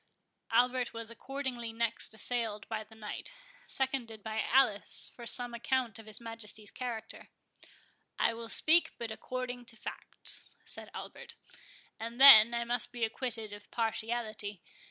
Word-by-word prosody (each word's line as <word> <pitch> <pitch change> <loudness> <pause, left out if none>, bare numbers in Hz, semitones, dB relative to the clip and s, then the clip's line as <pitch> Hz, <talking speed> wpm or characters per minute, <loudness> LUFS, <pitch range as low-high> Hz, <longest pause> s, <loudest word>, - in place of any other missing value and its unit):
Albert 245 +1 +3
was 230 0 -4
accordingly 255 -2 -4
next 230 0 0
assailed 220 -2 -1
by 220 -1 -3
the 220 +1 -16
Knight, 215 - -6 0.4
seconded 250 -5 -1
by 220 0 -2
Alice, 240 -6 +2
for 235 -1 -8
some 245 0 +1
account 235 -1 -1
of 220 - -12
his 215 0 -1
Majesty's 225 -2 -4
character. 235 -3 -6 0.9
"I 230 - +3
will 230 0 -6
speak 330 +7 +4
but 230 -2 -4
according 245 +2 -5
to 230 - -3
facts," - - -6
said - - -10
Albert; - - -7 0.6
"and 230 +2 -6
then 235 -4 +11
I 235 - 0
must 240 0 +1
be 240 -1 -4
acquitted 225 -2 -4
of 205 0 -11
partiality. 220 -3 -2
230 Hz, 140 wpm, -32 LUFS, 220-245 Hz, 0.9 s, then